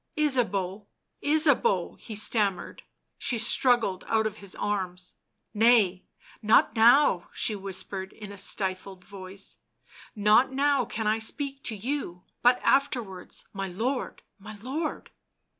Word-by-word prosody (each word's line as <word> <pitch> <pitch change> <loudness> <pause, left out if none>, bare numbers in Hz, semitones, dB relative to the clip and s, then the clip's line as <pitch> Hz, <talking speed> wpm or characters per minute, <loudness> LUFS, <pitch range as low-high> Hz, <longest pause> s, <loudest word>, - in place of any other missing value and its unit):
"Ysabeau, 210 -9 0 0.4
Ysabeau!" 310 - +2
he 220 - -8
stammered. 205 -3 0 0.4
She 245 - 0
struggled 230 -4 +2
out 220 -1 +1
of 215 - -3
his 200 -2 -7
arms. 185 -3 -4 0.4
"Nay, 215 -5 +3 0.4
not 220 +1 +4
now," 230 -5 +4
she 215 - -1
whispered 190 -1 -4
in 210 -2 -10
a - - -9
stifled 190 -1 -2
voice, 195 0 -8 0.3
" - - -27 0.2
not 215 +5 +4
now 275 -1 +1
can 220 0 -5
I 215 +1 +1
speak 275 +4 -3
to 225 - -2
you, 210 -5 -4 0.2
but 245 +1 +4
afterwards— 235 -9 -1
my 195 -1 -4
lord! 235 +9 -3 0.2
my 215 +2 -10
lord 300 +5 -4
215 Hz, 125 wpm, -27 LUFS, 195-250 Hz, 0.4 s, not